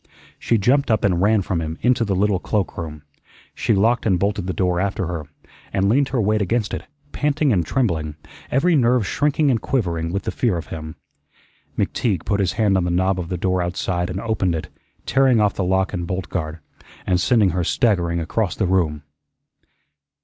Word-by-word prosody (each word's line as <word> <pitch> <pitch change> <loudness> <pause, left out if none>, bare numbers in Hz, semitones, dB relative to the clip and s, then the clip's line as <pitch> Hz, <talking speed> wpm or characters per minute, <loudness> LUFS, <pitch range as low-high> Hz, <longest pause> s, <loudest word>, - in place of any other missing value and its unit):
She 115 - +1
jumped 130 +7 +2
up 110 -2 +2
and 90 -3 +2
ran 105 0 +3
from 90 -2 -2
him 80 0 -4
into 125 -1 +3
the 100 -3 0
little 100 0 +2
cloakroom. 85 -7 -3 0.5
She 110 - +1
locked 115 +4 +2
and 95 -4 +3
bolted 100 0 -1
the - - 0
door 90 -1 0
after 95 -1 -1
her, 80 -4 -5 0.4
and 95 0 +1
leaned 135 +5 +3
her 130 - -1
weight 105 0 +1
against 105 +3 0
it, - - -4 0.3
panting 145 -2 +1
and 90 -4 +2
trembling, 80 - -1 0.3
every 165 +7 +3
nerve 125 -4 +3
shrinking 145 +2 +1
and 115 - 0
quivering 85 -10 -1
with 100 +2 -2
the - - -2
fear 115 -8 0
of 80 - -5
him. 80 -1 -7 0.8
McTeague 100 -9 -1
put 100 - 0
his 95 -2 +1
hand 105 -4 +2
on 90 - +1
the - - 0
knob 95 +2 +1
of 85 -2 -5
the 90 - -2
door 90 +1 0
outside 90 0 -2
and 90 +1 -3
opened 100 -6 0
it, 80 - -5 0.4
tearing 135 -3 +3
off 105 -2 +3
the 95 - -2
lock 95 +2 +1
and 90 -2 -3
bolt 90 +1 -3
guard, 80 -2 -3 0.5
and 90 -1 +1
sending 110 -7 +3
her 90 +1 -1
staggering 85 -4 +1
across 90 +5 -1
the 105 - 0
room. 85 -5 0
95 Hz, 195 wpm, -21 LUFS, 90-115 Hz, 0.8 s, ran